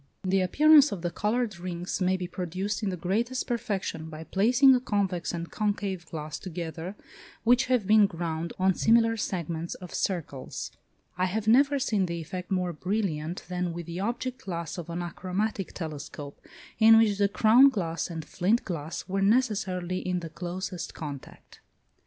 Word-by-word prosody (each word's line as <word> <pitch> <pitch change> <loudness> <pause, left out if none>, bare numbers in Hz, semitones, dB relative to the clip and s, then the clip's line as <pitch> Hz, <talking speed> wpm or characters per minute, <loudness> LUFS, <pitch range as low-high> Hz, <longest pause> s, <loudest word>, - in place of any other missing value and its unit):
The 190 0 +2
appearance 295 - +6
of 180 -4 -5
the 175 - -1
coloured 210 0 -1
rings 175 +1 -4
may 185 +1 +2
be 180 - -4
produced 185 +4 -3
in 210 - 0
the 185 - -3
greatest 230 +9 -1
perfection 200 -8 -3
by 155 0 -8
placing 245 - +5
a 250 - +3
convex 195 -7 -1
and 170 -1 -5
concave 200 -4 -2
glass 155 -1 -6
together 170 +1 -6 0.5
which 245 +3 +4
have 250 -5 +1
been 210 0 +6
ground 165 -2 -4
on 190 0 +3
similar 225 +3 +4
segments 170 -5 -3
of 180 -2 -10
circles. 160 -8 -3 0.5
I 185 - +3
have 210 +4 -2
never 275 +5 +5
seen 215 -8 +1
the 170 0 -3
effect 180 +3 -6
more 180 -2 0
brilliant 175 -2 -2
than 180 -1 -2
with 170 0 -6
the 170 +2 -6
object 240 +5 -3
glass 170 -2 -4
of 170 - -7
an 170 +1 -3
achromatic 190 +3 -3
telescope, 145 -3 -7 0.4
in 225 0 +8
which 210 -3 +3
the 200 -1 +3
crown 230 +6 +6
glass 170 -10 -2
and 165 -3 -6
flint 205 +10 +1
glass 165 -2 -5
were 195 +1 -1
necessarily 195 -5 +1
in 180 -1 -2
the 165 -2 -7
closest 180 +1 -5
contact. 145 -4 -9
185 Hz, 165 wpm, -28 LUFS, 170-215 Hz, 0.5 s, in